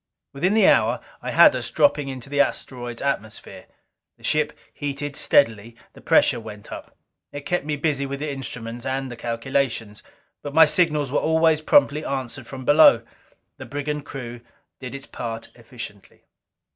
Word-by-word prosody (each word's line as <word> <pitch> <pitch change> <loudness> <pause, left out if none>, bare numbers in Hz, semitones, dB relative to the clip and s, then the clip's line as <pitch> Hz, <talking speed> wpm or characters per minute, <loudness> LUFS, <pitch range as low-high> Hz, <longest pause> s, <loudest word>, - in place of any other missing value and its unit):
Within 180 +9 +1
the 220 - +5
hour - - +3 0.2
I - - -5
had - - +6
us - - -3
dropping 150 - +2
into 130 -1 -7
the 145 0 +2
asteroid's 120 -4 -3
atmosphere. 110 -6 -4 0.5
The - - -24
ship 150 0 +1 0.2
heated 145 0 -4
steadily. 115 -6 +2 0.2
The - - -15
pressure - - +3
went 105 -2 -11
up. - - -10 0.3
It 145 0 -8
kept 180 -5 -1
me 150 -1 -1
busy 140 -2 -1
with 140 0 -5
the 150 0 -3
instruments 120 -3 -6
and 130 0 -3
the - - -6
calculations. 115 -2 -2 0.4
But 145 0 -7
my 160 0 +9
signals 150 -4 +1
were - - +2
always 160 -1 +2
promptly 155 - +3
answered 130 -2 -4
from 130 -1 -8
below. 150 +4 +6 0.5
The - - -9
brigand 145 +1 -4
crew 120 -4 -8 0.4
did 130 +1 -7
its 140 0 -8
part 115 -1 -6
efficiently. 115 -4 -11
140 Hz, 160 wpm, -23 LUFS, 120-150 Hz, 0.5 s, my